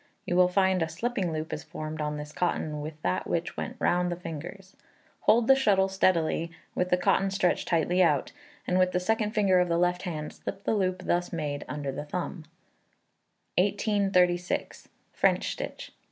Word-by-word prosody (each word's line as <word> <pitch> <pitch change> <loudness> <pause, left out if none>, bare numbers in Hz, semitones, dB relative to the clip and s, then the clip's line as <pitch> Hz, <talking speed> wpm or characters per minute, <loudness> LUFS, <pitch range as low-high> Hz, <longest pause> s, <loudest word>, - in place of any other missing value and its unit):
You 175 - -1
will 180 0 +6
find 190 0 +2
a 165 - 0
slipping 190 +1 -2
loop 155 0 -4
is 150 - -4
formed 155 0 -6
on 150 0 -2
this 150 0 -7
cotton 155 -3 -1
with 155 +1 -7
that 90 - -1
which - - -2
went - - -4
round 175 0 +1
the - - -1
fingers. 180 +3 -8 0.5
Hold 235 +1 +5
the 270 - +8
shuttle 200 -7 +3
steadily, 170 -3 +1 0.2
with 180 - 0
the 180 - +3
cotton 195 +2 +2
stretched 190 -2 0
tightly 175 +2 +2
out, 150 -6 +2 0.3
and 180 0 +1
with 185 0 +3
the 180 - +2
second 215 +3 0
finger 195 -4 +4
of 180 - +2
the 170 - +2
left 180 +1 +1
hand 155 -5 -5
slip 195 - -7
the - - +1
loop 185 -3 0
thus 175 0 0
made 150 -4 -3
under 145 -2 -3
the 140 +2 -5
thumb. 170 +1 -4 1.1
1836. 195 -3 +1 0.3
French - - +2
Stitch. - - -6
180 Hz, 180 wpm, -28 LUFS, 160-190 Hz, 1.1 s, the